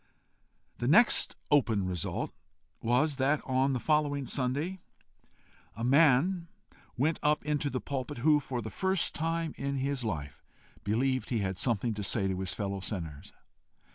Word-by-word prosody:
The 120 - -1
next 215 - +4 0.2
open 115 -9 +3
result 90 -3 -2 0.5
was, 130 +5 +2
that, 140 +2 +2
on 130 +1 +2
the 125 - -1
following 145 -1 +1
Sunday, 145 +9 -1 1.0
a 115 - -5
man 155 +6 +4 0.5
went 155 +6 +1
up 150 0 +1
into 150 -1 0
the 130 - -2
pulpit 130 -3 -4
who, 150 +4 +4
for 130 -4 -4
the 110 - -6
first 190 - 0
time 165 0 -1
in 140 0 -2
his 135 -1 -1
life, 75 -10 -4 0.4
believed 130 +5 0
he 120 - 0
had 95 -1 -2
something 115 -1 0
to 105 - -5
say 100 0 0
to 95 -1 -2
his 95 -1 -2
fellow 100 -2 -3
sinners. 85 -7 -6
130 Hz, 150 wpm, -30 LUFS, 110-150 Hz, 1.0 s, next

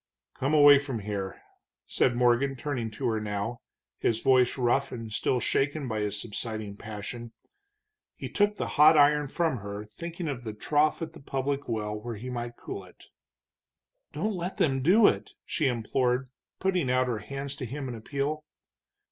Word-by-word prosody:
"Come 140 +4 0
away 145 -1 +9
from 135 -4 -4
here," 100 -2 -4 0.5
said 120 - +2
Morgan, 125 +3 +3
turning 125 -4 -3
to 110 - -6
her 110 -1 0
now, 105 +3 -3 0.4
his 115 -1 +1
voice 130 -2 +4
rough 130 +2 +1
and 115 -3 -6
still 125 - +1
shaken 140 +4 0
by 110 -2 -2
his 105 -1 -1
subsiding 110 -1 -4
passion. 110 +3 -7 0.8
He - - -6
took 205 0 +2
the - - -2 0.2
hot 155 +1 +8
iron 150 0 +5
from 160 -1 0
her, 100 0 -6
thinking 170 - -6
of 130 -4 -4
the 110 -2 -5
trough 150 +7 +1
at 160 0 -6
the 165 - -12
public 135 +1 -2
well 105 -2 -2
where 110 +2 -5
he 125 +5 -6
might 120 -1 -4
cool 100 - -6
it. 90 - -17 1.1
"Don't 210 +9 -1
let 180 0 -4
them 135 -3 +2
do 195 - +6
it," - - +2
she 150 - 0
implored, 125 +2 0 0.3
putting 185 -8 +1
out 130 0 +3
her 115 -3 -1
hands 140 +3 -5
to 130 - -4
him 135 +3 -5
in 125 - -4
appeal. 140 +6 -3
130 Hz, 175 wpm, -28 LUFS, 110-145 Hz, 1.1 s, away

